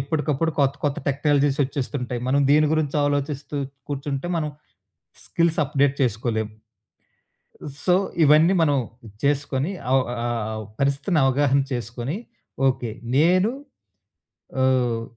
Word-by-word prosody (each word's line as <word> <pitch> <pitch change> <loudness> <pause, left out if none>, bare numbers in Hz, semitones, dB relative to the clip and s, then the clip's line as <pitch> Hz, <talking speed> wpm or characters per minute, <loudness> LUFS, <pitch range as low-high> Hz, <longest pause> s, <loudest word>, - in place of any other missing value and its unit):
ఎప్పటికప్పుడు 150 +2 0
కొత్త 140 -1 +3
కొత్త 145 -1 0
టెక్నాలజీసొచ్చేస్తుంటాయి. 140 -3 0
మనం 140 +2 +3
దీని 150 +1 +5
గురించి 155 -2 0
ఆలోచిస్తూ 145 0 -2 0.3
కూర్చుంటే 140 +1 -3
మనం 155 -2 -1 0.8
స్కిల్స్ 165 -1 0
అప్డేట్ 140 -1 +1
చేసుకోలేం. 110 -2 -1 1.4
సో 180 - +4 0.3
ఇవన్నీ 155 +5 +5
మనం 145 -3 +3 0.5
చేసుకొని 140 +2 0 0.2
ఆవ్ 135 0 +4
ఆహ్, 120 -1 -2
ఆవ్ 110 0 -5 0.2
పరిస్థితిని 140 +5 +1
అవగాహన 140 +1 +3
చేసుకొని. 120 - -4 0.5
ఓకే. 125 -3 -2 0.3
నేను 180 +7 +4 1.1
ఆహ్, 125 -3 +2
140 Hz, 105 wpm, -23 LUFS, 130-150 Hz, 1.4 s, దీని